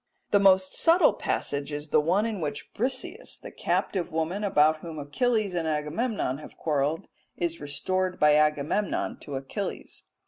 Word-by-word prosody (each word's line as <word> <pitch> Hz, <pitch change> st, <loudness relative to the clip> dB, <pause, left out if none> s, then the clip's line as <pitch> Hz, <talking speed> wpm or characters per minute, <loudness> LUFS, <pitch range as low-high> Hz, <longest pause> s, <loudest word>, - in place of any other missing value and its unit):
The 205 Hz, -, +5 dB
most 190 Hz, -1 st, +4 dB
subtle 335 Hz, +3 st, +5 dB
passage 140 Hz, +1 st, -2 dB
is 150 Hz, +1 st, -5 dB
the 150 Hz, -, +4 dB
one 185 Hz, +8 st, +2 dB
in 215 Hz, -5 st, -3 dB
which 145 Hz, -2 st, -4 dB
Briseis, 255 Hz, +4 st, -3 dB
the -, -, -10 dB
captive 185 Hz, -4 st, -1 dB
woman 160 Hz, +6 st, -2 dB
about 155 Hz, -5 st, +4 dB
whom 165 Hz, -1 st, -8 dB
Achilles 215 Hz, -, 0 dB
and 170 Hz, -2 st, -1 dB
Agamemnon 150 Hz, -, -1 dB
have 155 Hz, -, -12 dB
quarrelled, 150 Hz, 0 st, -1 dB, 0.3 s
is 170 Hz, -2 st, -2 dB
restored 185 Hz, +6 st, -1 dB
by 150 Hz, 0 st, +6 dB
Agamemnon 150 Hz, +6 st, +1 dB
to 145 Hz, -, -7 dB
Achilles. 135 Hz, +10 st, -5 dB
160 Hz, 150 wpm, -27 LUFS, 150-200 Hz, 0.3 s, by